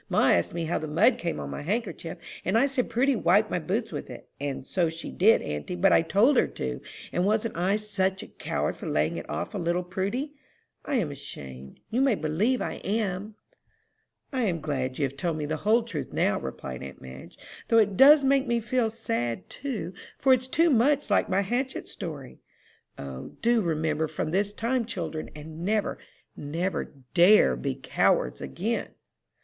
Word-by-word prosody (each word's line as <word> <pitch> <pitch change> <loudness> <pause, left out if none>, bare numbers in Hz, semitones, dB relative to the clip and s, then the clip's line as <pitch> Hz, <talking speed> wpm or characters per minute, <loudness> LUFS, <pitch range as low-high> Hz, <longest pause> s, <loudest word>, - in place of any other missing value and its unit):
"Ma - - +3
asked 85 - +3
me 170 -1 -1
how 165 - 0
the 155 - -5
mud 215 - +3
came 170 -5 -2
on - - -5
my - - -5
handkerchief, 180 -2 -3 0.3
and 190 +5 +2
I 255 - +5
said 275 -3 -1
Prudy 265 +3 +2
wiped 205 +2 +3
my - - +1
boots 215 +7 -2
with - - -5
it. - - -10
And 140 -2 -4
so 175 0 +1
she 165 +1 -7
did, 220 +5 +4
auntie, 75 - -4
but 185 +2 +4
I - - +6
told 210 - +3
her - - +4
to; 65 -1 -5 0.3
and 175 - 0
wasn't 215 +3 +1
I 185 +4 +1
such 190 -3 -1
a - - -10
coward - - -2
for - - -7
laying - - +1
it - - -7
off - - -3
on 195 -4 -3
little 175 +2 0
Prudy? 200 +11 -3 0.5
I 285 - -2
am 185 - 0
ashamed 65 - -9
you 245 +4 +1
may 270 -5 +4
believe 195 +11 0
I - - -5
am." 205 0 -2 1.0
"I 255 -3 +1
am 175 -5 0
glad 135 -4 -2
you 150 - -1
have 135 0 -5
told 160 +3 -2
me 150 - -2
the 155 +2 -2
whole 220 +7 +3
truth 195 -11 -5
now," - - +1
replied 65 -1 -6
aunt 70 - -8
Madge, 65 +1 -11 0.3
"though 230 - +4
it 210 -3 +4
does 285 +5 +8
make 270 0 +3
me 235 0 +2
feel 235 0 0
sad, 120 - -3
too, 220 - -4 0.2
for 265 - +5
it's 255 0 +1
too 330 +5 +3
much 285 +4 +3
like - - +3
my 190 +1 +2
hatchet 250 +6 -2
story. 150 -8 -7 0.6
O, 65 -1 -8
do 235 0 +4
remember 160 -2 0
from 155 - -3
this 200 +3 +1
time, 235 +4 0
children, 165 -7 -5
and 155 +2 -8
never, 210 +2 0 0.4
never, 165 +5 -2 0.3
dare 185 +5 +6
be 135 -2 -3
cowards 135 - +1
again!" 65 - -3
190 Hz, 190 wpm, -27 LUFS, 155-230 Hz, 1.0 s, does